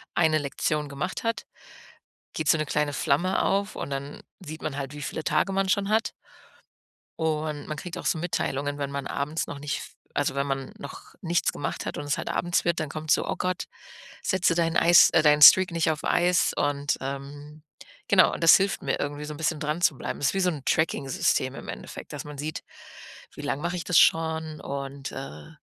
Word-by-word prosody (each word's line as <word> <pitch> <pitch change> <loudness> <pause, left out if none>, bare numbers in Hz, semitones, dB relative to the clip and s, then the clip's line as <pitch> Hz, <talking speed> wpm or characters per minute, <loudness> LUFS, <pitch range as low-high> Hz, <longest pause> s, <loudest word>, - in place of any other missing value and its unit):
eine 160 -2 +3
Lektion 145 +1 -2
gemacht 150 +10 -4
hat, 230 -2 -1 0.9
geht 155 -2 -2
so 160 - +5
'ne 155 - -1
kleine 150 0 0
Flamme 175 +9 +1
auf 200 +1 0
und - - -5
dann 140 +1 -5 0.2
sieht 155 -3 -9
man 140 -2 -3
halt, 135 0 -5
wie 145 - -8
viele 160 - -5
Tage 170 +6 +1
man 195 0 0
schon 195 +1 +1
hat. 225 +1 +1 1.1
Und 155 -2 -2
man 155 - -5
kriegt 175 +2 -7
auch - - -7
so - - +1
Mitteilungen, 145 -4 -2
wenn 140 -1 -3
man 140 0 -4
abends 150 +3 -3
noch 145 - -7
nicht 145 0 -3
f - - -10 0.3
also, 145 -2 +1
wenn 140 0 -1
man 135 -1 -3
noch 140 - -10
nichts 170 -1 0
gemacht 140 - -4
hat - - -4
und 145 - -5
es 145 - -1
halt - - -4
abends 175 0 0
wird, 170 -1 0
dann 155 - -2
kommt 155 +1 -4
so: - - +3
„Oh - - -1
Gott, 185 -1 -2 0.6
setze 185 -3 +2
dein 165 0 0
Eis 170 0 +7
äh, 160 - +4
deinen 150 -1 +5
Streak 185 +5 +9
nicht 165 -1 +1
auf 155 - -3
Eis.“ 180 +1 +2
Und, 145 -1 0
ähm 145 +3 -7 0.5
genau. - - +5
Und - - -8
das 165 - +9
hilft 195 +1 -1
mir 135 - -1
irgendwie 145 +1 -4
so 150 - -6
'n 145 - -9
bisschen 160 -1 0
dran 150 +3 -2
zu 155 -5 +3
bleiben. - - -5
Das 140 - +1
ist - - -1
wie 195 - 0
so 180 - +3
'n 150 -6 -6
Tracking-System 155 -3 0
im - - -9
Endeffekt, - - -8
dass - - -6
man 150 -1 -9
sieht: 155 +2 -5 0.7
Wie - - -10
lange 145 +3 -2
mache 175 +1 -2
ich 175 - -4
das 180 - +3
schon 160 -1 +2
und, 140 0 -6
äh 75 - -8
155 Hz, 215 wpm, -26 LUFS, 140-170 Hz, 1.1 s, Streak